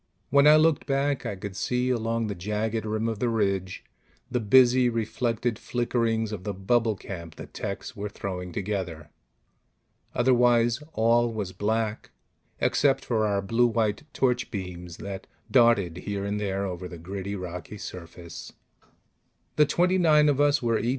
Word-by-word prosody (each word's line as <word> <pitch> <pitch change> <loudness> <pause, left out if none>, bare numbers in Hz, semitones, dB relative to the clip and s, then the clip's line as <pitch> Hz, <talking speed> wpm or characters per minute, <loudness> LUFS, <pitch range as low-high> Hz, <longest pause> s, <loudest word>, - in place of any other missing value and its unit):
When 140 +1 +6
I 150 - +9
looked 155 -1 +3
back, 140 0 0
I 100 - -3
could 95 0 -7
see, 125 +5 0
along 115 -1 -1
the 105 - -3
jagged 105 +4 -2
rim 110 +1 -1
of 110 -2 -3
the 120 - +1
ridge, 100 -4 -1 0.5
the 125 - +1
busy 125 +2 +5
reflected 115 0 -1
flickerings 115 -2 -1
of 100 -4 -5
the 100 -1 -4
bubble 110 +3 +1
camp 85 -4 -8
the - - -8
techs - - -6
were 105 +1 -4
throwing 90 -3 -5
together. 90 -6 -4 1.0
Otherwise 120 -1 +3
all 115 +1 +3
was 105 -4 -4
black, 110 +2 -2 0.5
except 140 -2 +2
for 110 -3 +1
our 100 -1 0
blue 115 +5 +3
white 115 +4 -1
torch 125 -2 0
beams 90 -4 -6
that 95 -1 -7 0.2
darted 115 -9 +4
here 100 +1 -4
and 100 +1 -2
there 100 -1 -2
over 90 -1 -5
the 85 - -9
gritty, 95 +4 -5
rocky 90 +1 -7
surface. 85 -3 -9 1.0
The 150 -1 +5
twenty 180 +4 +2
nine 150 -3 +5
of 145 0 +2
us 145 -1 +3
were 115 -2 +2
E. 120 - -1
110 Hz, 155 wpm, -26 LUFS, 95-120 Hz, 1.0 s, I